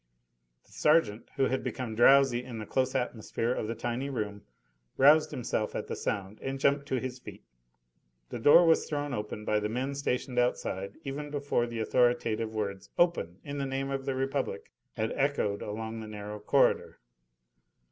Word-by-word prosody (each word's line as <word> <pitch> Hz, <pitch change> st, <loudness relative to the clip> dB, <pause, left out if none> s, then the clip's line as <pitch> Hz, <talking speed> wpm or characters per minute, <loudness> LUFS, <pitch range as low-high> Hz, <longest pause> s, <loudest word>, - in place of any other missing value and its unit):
The -, -, -26 dB
sergeant, 135 Hz, -9 st, +2 dB
who -, -, +1 dB
had 130 Hz, 0 st, -1 dB
become 125 Hz, -4 st, -4 dB
drowsy 125 Hz, +1 st, +5 dB
in 125 Hz, -2 st, -7 dB
the 110 Hz, -, -5 dB
close 130 Hz, +4 st, 0 dB
atmosphere 120 Hz, -1 st, -1 dB
of 110 Hz, -, -3 dB
the 115 Hz, -, -3 dB
tiny 120 Hz, +4 st, -3 dB
room, 105 Hz, -6 st, -4 dB, 0.6 s
roused 150 Hz, +3 st, +6 dB
himself 120 Hz, -5 st, -2 dB
at -, -, -3 dB
the -, -, -4 dB
sound 100 Hz, +1 st, -3 dB
and 135 Hz, 0 st, -3 dB
jumped 140 Hz, +1 st, +2 dB
to 130 Hz, -, 0 dB
his 130 Hz, +1 st, -5 dB
feet. -, -, -11 dB, 0.9 s
The -, -, -5 dB
door 145 Hz, +8 st, +7 dB
was 165 Hz, -1 st, +3 dB
thrown 145 Hz, -2 st, -2 dB
open 105 Hz, -1 st, -5 dB
by 105 Hz, 0 st, +2 dB
the 105 Hz, 0 st, -2 dB
men 130 Hz, +5 st, -2 dB
stationed 125 Hz, -2 st, -1 dB
outside 100 Hz, -5 st, -1 dB
even 145 Hz, +2 st, -5 dB
before 140 Hz, -4 st, 0 dB
the 115 Hz, -1 st, -5 dB
authoritative 115 Hz, -2 st, +1 dB
words, 100 Hz, -2 st, -3 dB
"Open! 170 Hz, -, +1 dB
in 145 Hz, 0 st, -5 dB
the 135 Hz, -, -1 dB
name 135 Hz, +1 st, -2 dB
of 135 Hz, -1 st, -3 dB
the 135 Hz, -, -1 dB
Republic!" 135 Hz, +1 st, -2 dB, 0.2 s
had 110 Hz, 0 st, -2 dB
echoed 135 Hz, -8 st, 0 dB
along 110 Hz, +2 st, -5 dB
the 110 Hz, -, -7 dB
narrow 105 Hz, 0 st, -7 dB
corridor. 105 Hz, -, +2 dB
125 Hz, 175 wpm, -29 LUFS, 110-140 Hz, 0.9 s, door